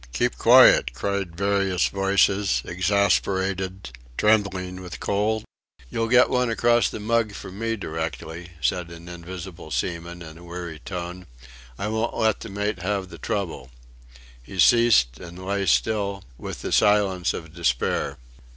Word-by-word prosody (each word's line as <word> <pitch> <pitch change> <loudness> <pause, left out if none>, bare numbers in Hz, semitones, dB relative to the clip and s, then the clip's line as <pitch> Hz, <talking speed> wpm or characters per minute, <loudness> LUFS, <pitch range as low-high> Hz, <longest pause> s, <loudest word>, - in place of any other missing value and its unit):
"Keep 65 - 0
quiet!" - - +7
cried 95 +3 -2
various 100 -2 +1
voices, 100 0 +2
exasperated, 95 -2 0 0.3
trembling 95 -4 +1
with 90 -2 -8
cold. 110 +2 0 0.5
"You'll 115 0 -1
get 125 +2 +6
one 125 -2 +1
across 120 +1 +3
the - - -6
mug 110 0 0
from 95 0 -9
me 115 0 -1
directly," 80 - -5
said 85 +6 0
an 85 0 -11
invisible 90 -1 -8
seaman, 85 +6 -3
in 80 0 -11
a - - -14
weary 85 -2 -7
tone, 90 +2 -6 0.5
"I 100 - -3
won't 110 +2 -1
let 110 -1 +2
the 115 - -8
mate 105 0 -2
have 95 0 -2
the - - -11
trouble." 80 -11 -3 0.7
He 95 +10 -11
ceased 95 - +5
and 90 +1 -10
lay 100 0 -1
still 100 - +1
with - - -7
the - - -3
silence 100 -4 +3
of 80 -1 -8
despair. 70 -3 0
95 Hz, 140 wpm, -24 LUFS, 85-105 Hz, 0.7 s, quiet